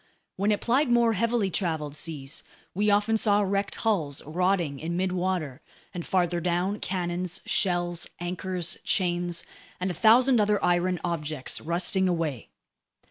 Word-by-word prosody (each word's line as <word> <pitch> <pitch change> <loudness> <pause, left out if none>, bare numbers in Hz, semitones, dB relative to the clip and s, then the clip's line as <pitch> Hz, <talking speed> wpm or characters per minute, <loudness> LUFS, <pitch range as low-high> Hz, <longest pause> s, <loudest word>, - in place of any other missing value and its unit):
When 200 +3 +1
it 205 - 0
plied 260 +4 +2
more 235 -1 +4
heavily 230 -2 +1
traveled 160 -6 -2
seas, 150 -2 -5 0.3
we 210 +3 +1
often 205 +2 +3
saw 210 -1 +3
wrecked 200 +1 -1
hulls 160 -11 0
rotting 170 -2 0
in 170 +2 -3
midwater, 180 -6 -1 0.3
and 175 - -4
farther 175 -1 +1
down, 180 +4 0
cannons, 180 -1 -2
shells, 175 -2 +1
anchors, 175 0 -3
chains, 175 -2 +1 0.4
and 185 +1 -1
a - - -4
thousand 235 +6 +5
other 210 0 +2
iron 175 0 +1
objects 155 -5 -3
rusting 180 +3 +1
away. 160 - -2
180 Hz, 135 wpm, -27 LUFS, 170-200 Hz, 0.4 s, thousand